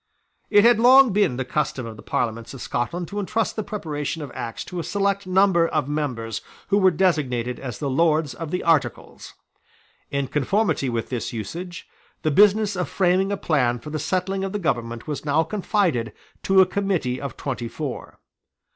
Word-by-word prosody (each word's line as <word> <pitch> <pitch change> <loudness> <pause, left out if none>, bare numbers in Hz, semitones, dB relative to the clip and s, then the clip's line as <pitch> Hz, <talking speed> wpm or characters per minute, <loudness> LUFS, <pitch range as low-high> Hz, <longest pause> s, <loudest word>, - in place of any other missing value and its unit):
It 205 -1 +6
had 235 -2 +6
long 255 -1 +7
been 200 -12 +2
the 130 - -2
custom 135 -2 -2
of 115 -1 -7
the 110 - -12
Parliaments 115 +2 -3
of 130 - -9
Scotland 170 +8 -2
to 205 - -4
entrust 215 +2 -1
the 215 - -1
preparation 160 -7 -4
of 140 - -8
Acts 115 -1 -5
to 180 - -6
a - - -2
select 200 +2 -1
number 185 -2 +4
of 155 -4 -1
members 125 -7 -3 0.3
who 200 0 +3
were 190 -1 +6
designated 145 -9 0
as 125 -5 -6
the 145 - -3
Lords 155 +1 +2
of 165 -1 -6
the 180 - -2
Articles. 165 -4 -1 0.7
In 140 -1 -1
conformity 150 - 0
with 115 -2 -3
this 120 -3 -3
usage, 170 - -6 0.4
the 155 - +2
business 205 +4 +4
of 180 -1 -2
framing 190 +1 +2
a 200 - -1
plan 125 -9 +1
for 135 +6 -9
the 155 - -2
settling 190 +3 -1
of 195 0 -3
the - - 0
government 120 - -2
was 150 -2 -4
now 150 +2 +2
confided 175 - 0 0.3
to 190 0 +5
a - - +6
Committee 180 -10 -1
of 140 - -6
twenty 125 -4 -4
four. 140 +1 -6
160 Hz, 185 wpm, -23 LUFS, 130-195 Hz, 0.7 s, long